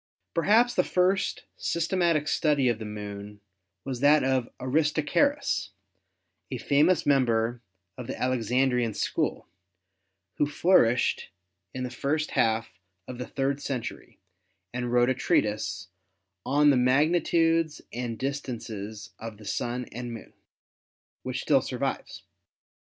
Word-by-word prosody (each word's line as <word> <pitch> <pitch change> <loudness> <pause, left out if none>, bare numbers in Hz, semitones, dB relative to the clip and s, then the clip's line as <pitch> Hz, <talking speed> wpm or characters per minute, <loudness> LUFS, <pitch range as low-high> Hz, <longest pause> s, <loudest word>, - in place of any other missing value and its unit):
Perhaps 225 +8 +4
the 180 - +3
first 185 +1 +1
systematic 170 -3 0
study 145 -3 +2
of 115 -2 -1
the 110 - -6
Moon 105 -1 -7 0.5
was 130 -2 -4
that 145 +2 +5
of 130 -2 +1
Aristarchus, 160 - +1 0.8
a - - -3
famous 155 +6 +3
member 120 -4 +2 0.4
of 125 - -6
the - - -5
Alexandrine 125 -1 +1
school, - - -1 0.9
who 145 - +2
flourished 145 -6 +3 0.5
in 130 - -3
the 125 - -4
first 150 +4 -1
half 110 -3 0 0.3
of 125 -1 -7
the 125 - -5
third 135 +1 -1
cen 130 -5 -3
tury - - -9 0.6
and 125 0 -3
wrote 120 +1 +4
a - - +2
treatise 105 -6 0 0.6
"On 145 +2 +5
the 135 - +3
Magnitudes 165 +4 +2
and 120 -2 -4
Dis 140 +3 -2
tances 110 -3 -7
of 115 -2 -7
the 105 - -14
Sun 120 +4 -2
and 120 +1 -6
Moon," 115 - -9 0.9
which - - -4
still - - +4
survives. - - -4
130 Hz, 125 wpm, -27 LUFS, 115-150 Hz, 0.9 s, that